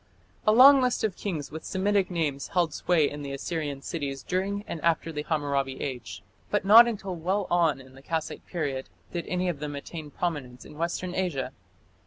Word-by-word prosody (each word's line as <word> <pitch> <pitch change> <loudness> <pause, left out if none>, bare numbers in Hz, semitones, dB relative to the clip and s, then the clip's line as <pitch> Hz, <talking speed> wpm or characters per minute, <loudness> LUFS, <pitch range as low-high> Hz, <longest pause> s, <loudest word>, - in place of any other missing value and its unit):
A - - +7
long 265 +4 +9
list 250 -1 +1
of 210 -4 0
kings 160 -8 -4
with 160 +1 -7
Semitic 200 0 +1
names 155 -6 -1
held 170 -4 +1
sway 160 -3 +2
in 145 +1 -6
the 140 -1 -5
Assyrian 145 -1 -4
cities 140 -5 -4
during 195 +2 -1
and 160 - -5
after 165 0 +1
the 150 -2 -3
Hammurabi 140 -4 -1
Age. 125 -8 -5 0.3
But 205 -2 0
not 225 +4 +9
until 195 -5 -3
well 185 +4 -1
on 165 -5 +3
in 130 0 -14
the 135 - -14
Kassite 160 +2 -3
period 140 -6 -3 0.2
did 170 -2 -3
any 180 0 -1
of 170 -5 -2
them 145 -1 -4
attain 150 +2 -7
prominence 145 -7 -4
in - - -12
Western 175 +2 -2
Asia. 175 -9 -1
165 Hz, 190 wpm, -27 LUFS, 145-185 Hz, 0.3 s, long